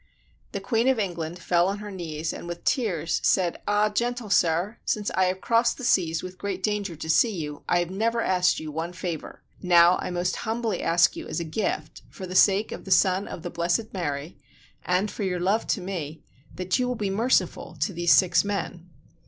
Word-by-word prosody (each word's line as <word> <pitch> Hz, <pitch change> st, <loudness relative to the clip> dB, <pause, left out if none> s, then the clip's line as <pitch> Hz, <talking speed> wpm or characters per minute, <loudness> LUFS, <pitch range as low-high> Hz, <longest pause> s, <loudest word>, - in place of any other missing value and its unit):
The -, -, -3 dB
Queen 230 Hz, +1 st, 0 dB
of 265 Hz, -2 st, +3 dB
England 175 Hz, -5 st, -3 dB
fell 175 Hz, 0 st, +2 dB
on 200 Hz, +1 st, -1 dB
her 210 Hz, 0 st, -8 dB
knees 165 Hz, -4 st, -4 dB
and -, -, -8 dB
with 175 Hz, 0 st, -6 dB
tears 180 Hz, -, 0 dB
said, 180 Hz, -3 st, +2 dB
"Ah, 205 Hz, +1 st, +3 dB
gentle 235 Hz, 0 st, -2 dB
sir, 175 Hz, +4 st, +2 dB
since 210 Hz, -1 st, -1 dB
I 185 Hz, -, +2 dB
have 185 Hz, +1 st, -1 dB
crossed 235 Hz, +1 st, +2 dB
the 260 Hz, -, -8 dB
seas 165 Hz, -9 st, +2 dB
with 185 Hz, 0 st, -8 dB
great 190 Hz, -1 st, -4 dB
danger 205 Hz, -5 st, -1 dB
to 160 Hz, -, -7 dB
see 205 Hz, +7 st, +3 dB
you, 150 Hz, -4 st, -5 dB
I 175 Hz, -, +4 dB
have 175 Hz, 0 st, -1 dB
never 230 Hz, +4 st, 0 dB
asked 180 Hz, -4 st, +2 dB
you 155 Hz, -1 st, -6 dB
one 165 Hz, +3 st, -4 dB
favor: 175 Hz, -3 st, -6 dB, 0.2 s
now, 175 Hz, -1 st, +5 dB
I -, -, -3 dB
most 180 Hz, 0 st, -1 dB
humbly 225 Hz, -4 st, -2 dB
ask 170 Hz, +1 st, +3 dB
you -, -, -7 dB
as 160 Hz, -, -3 dB
a -, -, -2 dB
gift, 155 Hz, -2 st, -3 dB
for 190 Hz, -, -8 dB
the 185 Hz, -, -7 dB
sake 200 Hz, +3 st, +4 dB
of -, -, -7 dB
the -, -, -8 dB
Son 185 Hz, +1 st, +3 dB
of 170 Hz, -, -8 dB
the 175 Hz, -, -5 dB
Blessed 175 Hz, +6 st, -1 dB
Mary, 150 Hz, -4 st, -4 dB, 0.4 s
and 185 Hz, +3 st, 0 dB
for -, -, -7 dB
your 185 Hz, -3 st, -1 dB
love 195 Hz, +5 st, +1 dB
to 200 Hz, -, 0 dB
me, 160 Hz, -5 st, -5 dB, 0.3 s
that 185 Hz, +6 st, -1 dB
you 250 Hz, -, +1 dB
will 250 Hz, -, -1 dB
be 205 Hz, -3 st, -2 dB
merciful 195 Hz, -6 st, 0 dB
to 185 Hz, +5 st, 0 dB
these 175 Hz, 0 st, +1 dB
six 170 Hz, -3 st, +5 dB
men." 190 Hz, -3 st, -4 dB
185 Hz, 210 wpm, -25 LUFS, 170-210 Hz, 0.4 s, now